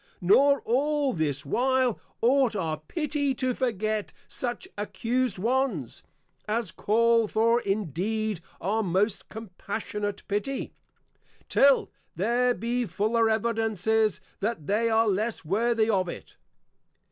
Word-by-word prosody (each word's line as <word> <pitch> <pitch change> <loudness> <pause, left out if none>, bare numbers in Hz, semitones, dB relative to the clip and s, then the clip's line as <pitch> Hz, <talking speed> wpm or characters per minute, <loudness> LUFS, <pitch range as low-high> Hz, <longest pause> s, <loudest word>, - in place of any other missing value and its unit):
Nor 275 +10 +4
all 285 +3 +1
this 145 -3 -2
while, 255 - +1 0.2
ought 255 -1 +3
our 160 -5 -1
Pity 285 - -2
to 255 0 0
forget 215 -4 -2
such 245 +8 -4
Accused 235 +2 -1
ones, 225 - -1 0.5
as 215 -2 -1
call 230 +1 +2
for 230 +3 +2
indeed 205 +1 -2 0.2
our 210 +5 0
most 195 +2 0
Compassionate 210 0 -5
Pity, 210 +7 -2 0.8
till 275 -1 +4 0.2
there 240 +7 +2
be 240 +1 -1
fuller 220 +5 +1
Evidences 220 -2 +1 0.2
that 210 -7 -2
they 220 +5 +1
are 225 0 +3
less 210 0 -1
worthy 220 +5 +1
of 190 -5 +1
it. - - -9
220 Hz, 110 wpm, -27 LUFS, 200-245 Hz, 0.8 s, Nor